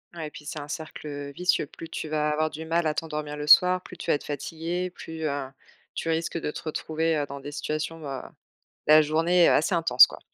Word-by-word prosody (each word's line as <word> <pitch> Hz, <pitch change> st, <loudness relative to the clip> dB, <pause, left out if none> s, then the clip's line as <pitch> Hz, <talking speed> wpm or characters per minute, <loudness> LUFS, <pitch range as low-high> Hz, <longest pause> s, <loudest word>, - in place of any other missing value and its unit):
Ouais 160 Hz, -2 st, -4 dB
et -, -, -8 dB
puis 150 Hz, -, -12 dB
c'est 150 Hz, 0 st, -5 dB
un 145 Hz, -, -7 dB
cercle, 155 Hz, 0 st, -7 dB
heu, 145 Hz, -1 st, -6 dB
vicieux. 180 Hz, -3 st, +2 dB
Plus 165 Hz, +3 st, -11 dB
tu 155 Hz, -, -5 dB
vas 150 Hz, 0 st, 0 dB
avoir 155 Hz, +1 st, 0 dB
du 160 Hz, +1 st, -7 dB
mal 165 Hz, +1 st, +1 dB
à 155 Hz, -, +2 dB
t'endormir 150 Hz, -1 st, -4 dB
le 150 Hz, 0 st, -5 dB
soir, 180 Hz, +4 st, +7 dB
plus 180 Hz, -, -12 dB
tu 170 Hz, -, -1 dB
vas -, -, +5 dB
être -, -, -5 dB
fatiguée, 165 Hz, +5 st, -3 dB
plus, 160 Hz, -2 st, -8 dB
heu, 140 Hz, -3 st, -1 dB, 0.5 s
tu -, -, -4 dB
risques 165 Hz, +1 st, -1 dB
de 150 Hz, -, -3 dB
te -, -, -7 dB
retrouver, 160 Hz, 0 st, -1 dB
heu, 145 Hz, -, 0 dB
dans 140 Hz, 0 st, -7 dB
des 145 Hz, +2 st, -8 dB
situations, 155 Hz, +2 st, -4 dB
heu, 135 Hz, -1 st, -4 dB, 0.7 s
la 155 Hz, 0 st, +8 dB
journée, 165 Hz, +3 st, +3 dB
heu, -, -, +5 dB
assez 160 Hz, +5 st, +2 dB
intense 160 Hz, -7 st, +7 dB
quoi. -, -, -11 dB
155 Hz, 240 wpm, -26 LUFS, 150-165 Hz, 0.7 s, la